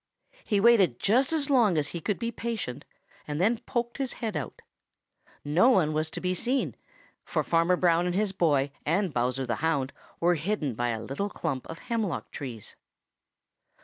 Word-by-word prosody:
He 205 -3 +1
waited 195 - +5
just 255 +8 +3
as 300 -3 0
long 225 - +4
as 150 -1 0
he 170 - -5
could 205 +4 -1
be 235 0 -3
patient 220 - -4 0.4
and 150 0 -3
then 220 +5 +2
poked 240 0 -2
his 270 -2 -2
head 225 -6 -4
out. 140 -6 -5 0.8
No 165 - +4
one 175 -11 +3
was 155 +1 0
to - - -6
be 180 0 0
seen, 250 +8 -1 0.5
for - - -1
Farmer 170 +2 +3
Brown 175 -1 +3
and 180 - -1
his 205 0 +1
boy 145 -7 +2
and 175 +2 0
Bowser 125 +2 0
the 120 -3 -2
Hound 140 -5 0 0.3
were 175 +1 +4
hidden 160 - -1
by 120 +2 -1
a 115 -1 -2
little 200 +10 -3
clump 130 -8 -3
of 165 - -7
hemlock 225 -5 -3
trees. 120 -7 -7
175 Hz, 180 wpm, -28 LUFS, 145-220 Hz, 0.8 s, waited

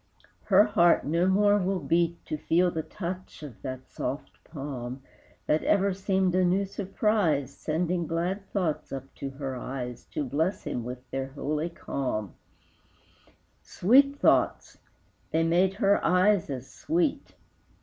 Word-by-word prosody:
Her 200 0 +6
heart 175 -5 +3
no 170 +5 +2
more 205 +2 +4
will 190 0 0
beat 170 +3 0
To 155 - -3
feel 175 +4 +2
the 160 - -2
touch 180 -1 -7
of 135 -7 -10
that 130 -1 -6
soft 135 +3 -5
palm, 135 -4 -6 0.4
That 155 - +1
ever 200 -1 +2
seemed 190 -1 +1
a 185 0 +3
new 185 +3 +2
surprise 190 - 0
Sending 170 +3 -1
glad 180 +5 -2
thoughts 175 -7 -2
up 135 0 -7
to 140 - -4
her 135 -1 -5
eyes 125 -1 -6
To - - 0
bless 160 +9 -1
him 120 - -3
with 125 +1 -7
their 135 0 -2
holy 150 +4 -3
calm, 125 - -3 1.3
Sweet 275 +8 +4
thoughts! - - +2 0.5
they 165 +1 +1
made 180 +3 +2
her 200 0 +2
eyes 185 +1 +3
as 130 -1 -5
sweet. 325 -2 -1
170 Hz, 140 wpm, -27 LUFS, 140-190 Hz, 1.3 s, Her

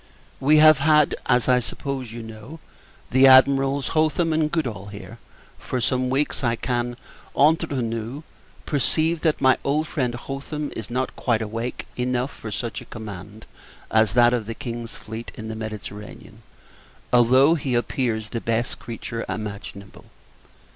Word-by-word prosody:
We 150 +3 +4
have 155 -1 +7
had, 150 0 +4
as 125 -2 +3
I 125 -1 +5
suppose 130 0 -5
you 115 0 -7
know, 110 +8 -10 0.5
the 130 +1 +6
Admirals 135 +1 +5
Hotham 160 +1 +1
and 155 -1 +1
Goodall 125 -12 -2
here, 110 +3 -10 0.4
for 130 - -3
some 130 +1 0
weeks. 140 +2 -1
I 120 -1 +2
can, 120 0 -2 0.4
entre 150 -3 +3
nous, 115 +5 -4 0.4
perceive 155 +3 +1
that 160 -3 +1
my 130 -1 +4
old 150 +3 +1
friend 125 -7 -1
Hotham 140 +4 -5
is 110 - -6
not 130 +2 -2
quite 115 -3 0
awake 115 +3 -4
enough 125 +2 -1
for 110 - -8
such 115 +2 -4
a - - -11
command 105 -1 -9 0.5
as 110 -2 +3
that 120 0 +5
of 115 -4 -1
the 115 - -4
King's 115 -1 -6
fleet 110 +1 -8
in 110 0 -7
the 110 - -4
Mediterranean, 105 -1 -8 0.7
although 130 +5 +6
he 135 -6 -1
appears 115 -3 -1
the 115 - -4
best 115 +1 -1
creature 115 0 -6
imaginable. 100 0 -7
125 Hz, 150 wpm, -23 LUFS, 115-140 Hz, 0.7 s, have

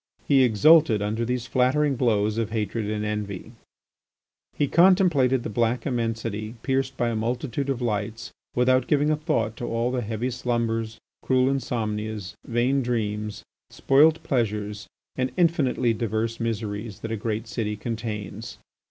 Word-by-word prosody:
He 135 -2 +5
exulted 125 +2 +5
under 110 +3 -1
these 125 0 -2
flattering 130 +4 +2
blows 110 -3 +1
of 115 -2 -1
hatred 110 -1 -2
and 105 0 -2
envy. 105 -1 -4 1.1
He 145 - +2
contemplated 170 - +4
the - - -4
black 115 +1 0
immensity 115 -3 -2
pierced 135 -1 -1
by 120 - +1
a 115 - -2
multitude 120 +4 -2
of 130 -2 -1
lights, 110 0 -3 0.2
without 130 +1 +3
giving 150 0 +2
a - - +3
thought 150 -9 -1
to 120 - -4
all 115 +2 0
the 125 -1 -1
heavy 115 +3 -3
slumbers, 115 -3 -2 0.2
cruel 130 0 +2
insomnias, 110 -6 -3
vain 125 +4 +1
dreams, 105 -3 -2 0.3
spoilt 155 +4 +3
pleasures, 105 -4 -2 0.3
and 130 0 0
infinitely 140 -8 +2
diverse 115 +1 -2
miseries 110 -2 -4
that 115 - -5
a - - 0
great 110 +1 -3
city 115 -3 -2
contains. 110 -1 -5
115 Hz, 145 wpm, -25 LUFS, 110-130 Hz, 1.1 s, He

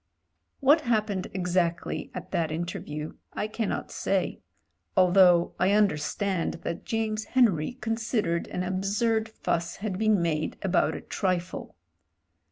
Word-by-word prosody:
What 290 +4 +6
happened 215 -7 0
exactly 180 -2 -1
at - - -7
that 160 -2 0
interview 155 -2 -4 0.2
I - - -2
cannot 215 -1 -3
say; - - -1 0.6
although 180 -2 +5
I 185 - +3
tmderstand 195 -2 +1
that 170 - -4
James 220 -1 -1
Henry 220 -10 +2
con 225 -3 -2
sidered 210 -7 -1
an 180 - -3
absurd 205 +4 0
fuss 170 -6 -2
had 195 -2 -4
been 215 -2 +3
made 155 -2 -1
about 190 -2 +2
a - - -6
trifle. 185 -2 -2
190 Hz, 125 wpm, -27 LUFS, 170-220 Hz, 0.6 s, What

